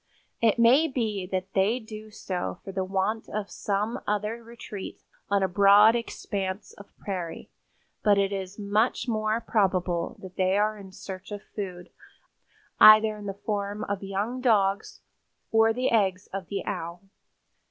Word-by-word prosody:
It 225 Hz, -1 st, +3 dB
may 250 Hz, +7 st, +5 dB
be 220 Hz, -9 st, -2 dB
that 185 Hz, 0 st, -3 dB
they 200 Hz, +5 st, +2 dB
do 215 Hz, -1 st, -10 dB
so 185 Hz, -4 st, -4 dB
for 195 Hz, -, -7 dB
the 190 Hz, 0 st, -2 dB
want 195 Hz, +4 st, -2 dB
of 210 Hz, -1 st, -4 dB
some 210 Hz, +3 st, -2 dB
other 210 Hz, +3 st, -1 dB
retreat 225 Hz, -4 st, -8 dB, 0.3 s
on 200 Hz, -1 st, +2 dB
a -, -, +3 dB
broad 200 Hz, +4 st, +6 dB
expanse 200 Hz, -4 st, -4 dB
of 200 Hz, -, -14 dB
prairie, 180 Hz, -5 st, -6 dB, 0.5 s
but 205 Hz, -2 st, +4 dB
it 200 Hz, 0 st, +1 dB
is 190 Hz, 0 st, -5 dB
much 210 Hz, +5 st, 0 dB
more 215 Hz, -1 st, 0 dB
probable 185 Hz, -6 st, 0 dB
that 185 Hz, -1 st, -10 dB
they 185 Hz, +1 st, +2 dB
are 215 Hz, +1 st, +1 dB
in 195 Hz, -2 st, -11 dB
search 190 Hz, +1 st, -9 dB
of 205 Hz, 0 st, -6 dB
food, 180 Hz, -4 st, -7 dB, 0.9 s
either 215 Hz, 0 st, +8 dB
in 205 Hz, -1 st, -8 dB
the 195 Hz, -, -4 dB
form 205 Hz, 0 st, -2 dB
of 200 Hz, -1 st, -3 dB
young 200 Hz, +6 st, -3 dB
dogs 200 Hz, -5 st, +1 dB, 0.5 s
or 225 Hz, 0 st, +5 dB
the 250 Hz, +3 st, 0 dB
eggs 195 Hz, -4 st, +2 dB
of 195 Hz, -2 st, -5 dB
the 200 Hz, -2 st, -4 dB
Owl. 170 Hz, +2 st, -5 dB
200 Hz, 155 wpm, -27 LUFS, 190-215 Hz, 0.9 s, either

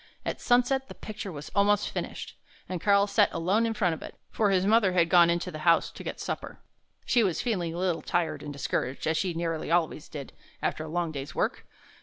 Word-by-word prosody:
At -, -, -3 dB
sunset 250 Hz, +2 st, +2 dB
the -, -, -10 dB
picture 210 Hz, -2 st, -7 dB
was 150 Hz, -2 st, -8 dB
almost 205 Hz, +1 st, +3 dB
finished, -, -, -5 dB, 0.3 s
and 180 Hz, -2 st, -4 dB
Karl 200 Hz, -1 st, +4 dB
sat 205 Hz, 0 st, +3 dB
alone 190 Hz, +7 st, +1 dB
in 225 Hz, -, -2 dB
front 185 Hz, -6 st, +2 dB
of 160 Hz, -, -7 dB
it, -, -, -9 dB, 0.2 s
for 210 Hz, -2 st, +2 dB
his 190 Hz, -1 st, +2 dB
mother 210 Hz, -3 st, +4 dB
had 170 Hz, -2 st, +3 dB
gone 175 Hz, -2 st, +7 dB
into 170 Hz, 0 st, -1 dB
the 155 Hz, -, -7 dB
house 165 Hz, +1 st, +3 dB
to -, -, -10 dB
get -, -, -5 dB
supper. -, -, -5 dB, 0.5 s
He 240 Hz, -2 st, +3 dB
was 180 Hz, -6 st, 0 dB
feeling 180 Hz, -9 st, -1 dB
a -, -, -5 dB
little 180 Hz, -2 st, 0 dB
tired 175 Hz, -1 st, -1 dB
and 145 Hz, -, -6 dB
discouraged, 140 Hz, -1 st, -2 dB
as 160 Hz, 0 st, +1 dB
he 180 Hz, -3 st, -2 dB
nearly 165 Hz, -2 st, -2 dB
always 165 Hz, -3 st, 0 dB
did 140 Hz, -3 st, -8 dB, 0.3 s
after 155 Hz, -, -2 dB
a -, -, -8 dB
long 170 Hz, +1 st, -1 dB
day's 140 Hz, -1 st, -6 dB
work. -, -, -1 dB
175 Hz, 220 wpm, -28 LUFS, 165-205 Hz, 0.5 s, gone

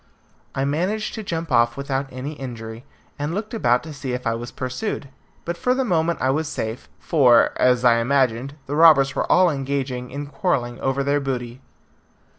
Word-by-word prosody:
I 135 Hz, -, 0 dB
managed 180 Hz, +10 st, -1 dB
to 220 Hz, -, -5 dB
jump 165 Hz, -5 st, -4 dB
off 120 Hz, 0 st, +3 dB
without 140 Hz, 0 st, -2 dB
any 130 Hz, +4 st, -5 dB
injury, 115 Hz, -3 st, -8 dB, 0.3 s
and 150 Hz, +4 st, -2 dB
looked 215 Hz, +3 st, -4 dB
about 125 Hz, -, +2 dB
to 155 Hz, -1 st, -8 dB
see 135 Hz, -3 st, -5 dB
if 125 Hz, 0 st, -4 dB
I 115 Hz, -, +1 dB
was 120 Hz, +1 st, -5 dB
pursued. 135 Hz, -, -4 dB, 0.4 s
But 170 Hz, 0 st, -3 dB
for 250 Hz, +6 st, +1 dB
the 265 Hz, 0 st, 0 dB
moment 170 Hz, -4 st, +1 dB
I 130 Hz, -, +3 dB
was 155 Hz, +3 st, -1 dB
safe, 110 Hz, -3 st, -5 dB
for, 125 Hz, -7 st, +4 dB
as 125 Hz, -1 st, +3 dB
I 120 Hz, -1 st, +6 dB
imagined, 130 Hz, +1 st, +1 dB
the 145 Hz, -, -3 dB
robbers 150 Hz, -4 st, +6 dB
were -, -, -1 dB
all 180 Hz, -1 st, +5 dB
engaged 135 Hz, -1 st, -2 dB
in 125 Hz, +3 st, -5 dB
quarrelling 135 Hz, -5 st, -1 dB
over 135 Hz, +1 st, 0 dB
their 140 Hz, +1 st, +1 dB
booty. 125 Hz, -2 st, -4 dB
135 Hz, 185 wpm, -22 LUFS, 125-155 Hz, 0.4 s, I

